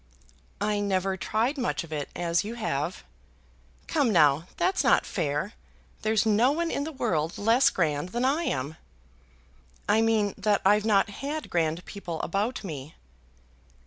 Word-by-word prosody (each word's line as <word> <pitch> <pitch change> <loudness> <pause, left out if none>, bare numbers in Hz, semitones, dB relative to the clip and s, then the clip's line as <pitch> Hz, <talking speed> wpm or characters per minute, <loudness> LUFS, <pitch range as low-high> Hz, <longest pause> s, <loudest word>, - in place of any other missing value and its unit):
"I 205 +1 0
never 195 -1 0
tried 230 +9 -1
much 245 -6 -1
of 160 -2 -9
it, 145 -2 -3
as 170 -1 0
you 220 +3 -5
have." 175 -7 -2 0.8
"Come 240 - +1
now; 155 -2 +4
that's 375 +1 +1
not - - +4
fair. 155 +4 -2 0.5
There's 220 0 +2
no 225 +4 +4
one 335 +3 -1
in 285 - -1
the 320 - -4
world 165 - -1
less 230 +5 +4
grand 155 -1 -1
than 240 +6 -1
I 300 +6 +1
am." 140 - -2 1.1
"I 220 - +4
mean 220 -3 +2
that 205 0 +1
I've 210 +2 +4
not 205 -1 +3
had 295 +2 -4
grand 165 0 0
people 175 -5 -6
about 210 +8 -1
me." 150 -5 -7
205 Hz, 150 wpm, -27 LUFS, 165-230 Hz, 1.1 s, now